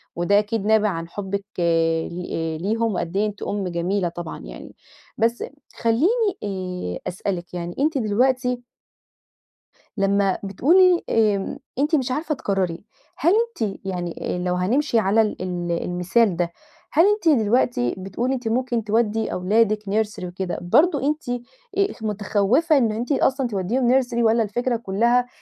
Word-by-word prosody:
وده 185 +4 +3
أكيد 210 0 -2
نابع 215 0 +4
عن 165 -2 -4
حبِّك 200 +1 -4
ل 165 -1 0
ليهم 225 +3 0
وقدّ 175 +2 -3
إيه 210 - +2
أنتِ 210 -1 -7
أم 200 -2 -2
جميلة 180 +2 -1
طبعًا 170 -1 -7
يعني. - - -10 0.4
بس 230 +2 +1 0.3
خليني 370 - +2
آآ، 185 - -4
أسألِك 180 -1 -4
يعني 175 0 -5
أنتِ 300 +1 +1
دلوقتي 250 +2 +1 1.3
لمّا 195 -1 +2
بتقولي 345 - +4
آمم، 210 -3 +1 0.2
أنتِ 300 +3 +2
مش 260 -4 0
عارفة 300 +3 -1
تقرّري، 190 -7 -2 0.3
هل 335 +6 +3 0.3
أنتِ 210 -3 -2
يعني 175 -3 -3
آآ - - -3
لو 180 0 -1
هنمشِي 230 +7 +1
على 210 +2 +3
ال 215 -4 -2
ال 175 -2 -3
المثال 185 +3 +1
ده، 170 0 -1 0.4
هل 330 +5 +5
أنتِ 415 -4 +3
دلوقتي 215 - +1
بتقولي 195 +7 -2
أنتِ 245 -3 -5
ممكن 240 0 0
تودّي 220 +1 0
أولادِك 215 +3 +2
nursery 210 -1 -1
وكده، 180 0 -4
برضه 285 - +3
أنتِ 300 -3 -2 0.5
آآ 395 0 +4
متخوّفة 215 - +2
إنه 225 -5 +2
أنتِ 240 +5 -3
أصلًا 270 -1 +2
تودّيهم 240 +6 +2
nursery 245 -2 -6
والّا 225 0 +4
الفكرة 240 +4 -1
كلّها 235 +4 +1
210 Hz, 145 wpm, -23 LUFS, 185-245 Hz, 1.3 s, هل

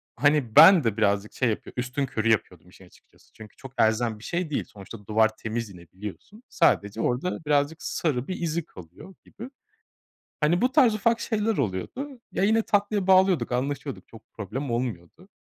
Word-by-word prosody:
hani, 145 -6 +1
ben 190 -5 +9
de 115 -2 -1
birazcık 100 -1 0
şey 125 -3 0
yapıyor, 110 - -5
üstünkörü 125 -3 -2
yapıyordum 90 -5 -2
işin 95 +1 -17
açıkçası. 90 - -25
Çünkü, 110 -2 -14
çok 135 -1 -11
elzem 110 0 +1
bir 110 - -15
şey 175 -1 -3
değil. 150 - -2
Sonuçta 100 +1 -13
duvar 110 0 +2
temiz 115 0 -4
yine 85 -3 -14
biliyorsun. 105 - -10
Sadece 110 - +1
orada 155 +6 -2
birazcık 145 +2 0
sarı 135 -6 -2
bir 185 - -5
izi 165 -1 -2
kalıyor 90 - -14
gibi. 235 +5 -10 0.9
Hani, 160 +4 +2
bu 255 - +2
tarz 260 -6 +4
ufak 230 +2 +1
şeyler 220 -1 -1
oluyordu. 230 - -4
Ya, - - -1
yine 220 +2 +3
tatlıya 205 -2 0
bağlıyorduk, 185 -5 +3
anlaşıyorduk. 135 +2 -4
Çok 110 -1 -16
problem 120 +6 -5
olmuyordu. 120 - -5
135 Hz, 165 wpm, -25 LUFS, 110-185 Hz, 0.9 s, ben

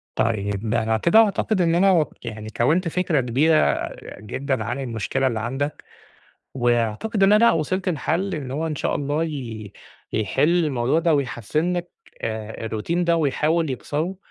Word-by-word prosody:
طيب 105 -1 -1
ده 115 0 +1
أنا 110 0 +1
كده 170 - +4
أعتقد 210 -2 +2
إن 165 -1 +2
أنا 195 +3 +5
وك 160 -8 0
يعني 110 -1 -6
كوِّنت 165 +9 +2
فكرة 165 -4 +1
كبيرة 145 +7 +2 0.3
جدًا 130 +6 -3
عن 135 - -3
المشكلة 130 +1 -1
اللي 115 -3 -1
عندك 135 +6 -3 0.7
وأعتقد 120 - 0
إن 195 +2 +6
أنا 230 +2 +6
وصلت 185 +4 -1
لحَل 180 +4 -1
إن 140 -4 -5
هو 150 +5 -2
إن 155 -2 -3
شاء - - -1
الله 145 +3 -1
ي 115 -9 -6 0.4
يحِل 160 - +2
الموضوع 135 +1 +1
ده 165 -1 +2
ويحسِّن 145 - -1
لك 175 0 -4 0.3
آآ 110 0 -4
الروتين 140 +11 -1
ده 170 0 +3
ويحاول 155 +1 +1
يكسره 155 +8 -3
145 Hz, 160 wpm, -23 LUFS, 115-170 Hz, 0.7 s, إن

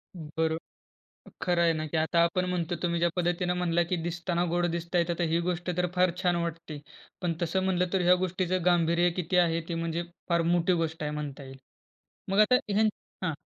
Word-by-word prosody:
बरो 160 0 -2 0.9
खरं 175 -1 +2
आहे 165 -1 +4
ना, 155 0 -3
की 160 - -3
आता 160 +2 +2
आपण 180 +2 0
म्हणतो 175 -1 -1
तुम्ही 170 -1 0
ज्या 170 - +3
पद्धतीने 175 0 0
म्हणला 175 -1 +1
की 180 - +2
दिसताना 175 +1 -1
गोड 175 0 +2
दिसत 170 +1 -5
आहे, 170 - +4
तर 170 0 -2
हि 170 - +3
गोष्ट 175 0 -2
तर 180 0 +1
फार 180 0 +3
छान 175 -1 +2
वाटते. 165 -3 -4 0.4
पण 175 -2 +1
तसं 180 +3 0
म्हणलं 180 -1 0
तर 190 - +2
ह्या 180 - +8
गोष्टीचं 185 0 -1
गांभीर्य 175 0 +3
किती 180 +2 -1
आहे? 165 0 0
ते 170 - -2
म्हणजे 165 0 -2 0.3
फार 170 -1 +2
मोठी 175 +1 +2
गोष्ट 160 0 -3
आहे 150 - -1
म्हणता 150 -2 -5
येईल. 135 0 -11 0.7
मग 195 - +1
आता 215 +4 +6
ह्यांच 215 +2 +3 0.3
हां. 160 - 0
170 Hz, 200 wpm, -28 LUFS, 165-180 Hz, 0.9 s, ह्या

